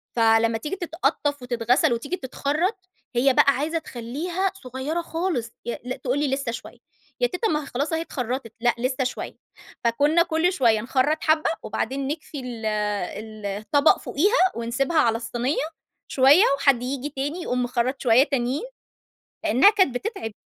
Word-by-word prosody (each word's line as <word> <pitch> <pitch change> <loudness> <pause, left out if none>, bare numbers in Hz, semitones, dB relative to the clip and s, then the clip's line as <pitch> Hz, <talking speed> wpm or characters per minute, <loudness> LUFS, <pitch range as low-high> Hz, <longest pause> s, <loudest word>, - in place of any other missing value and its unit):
فلمّا 225 0 +3
تيجي 300 +11 -4
تتقطّف 315 -5 -1
وتتغسل 245 +1 +2
وتيجي 285 +10 -3
تتخرّط، 305 - -1 0.4
هي 260 +2 +4
بقى 280 - +5
عايزة 310 +5 -1
تخلّيها 315 +10 -3
صغيرة 260 +7 -3
خالص. 325 -9 -2
ي 235 - -3
لأ 250 +1 -4
تقول 260 +2 -1
لي: 295 - +1
"لسّه 270 -3 -1
شوية." 235 - -9 0.4
"يا - - +3
تيتة 420 +3 -2
ما 300 -1 0
هي - - -9
خلاص 285 +5 -2
أهي 325 - 0
اتخرّطت." 250 -5 -4
"لأ، 240 +1 +3
لسّه 255 +2 -1
شوية." 255 - -4 0.5
فكُنّا 290 +8 +3
كل 335 +3 +1
شوية 230 - +3
نخرّط 265 +6 +1
حبّة 315 +1 +3
وبعدين 270 +1 -2
نكفي 300 -1 -5
ال 240 -3 -6
ال 210 0 -3
الطَبَق 215 +10 +2
فوقيها 400 - +2
ونسيبها 255 +7 -1
على 230 -3 +3
الصينية، 240 +5 -2 0.4
شوية 280 +9 +6
وحد 270 -4 +3
ييجي 275 +2 -3
تاني 290 +5 -4
يقوم 250 -5 -1
مخرّط 250 +2 -1
شوية 245 +1 +5
تانيين، 270 - -1 0.8
لإنّها 320 - +6
كانت 380 - +2
بتتعِب. 385 - -4
265 Hz, 155 wpm, -24 LUFS, 240-310 Hz, 0.8 s, شوية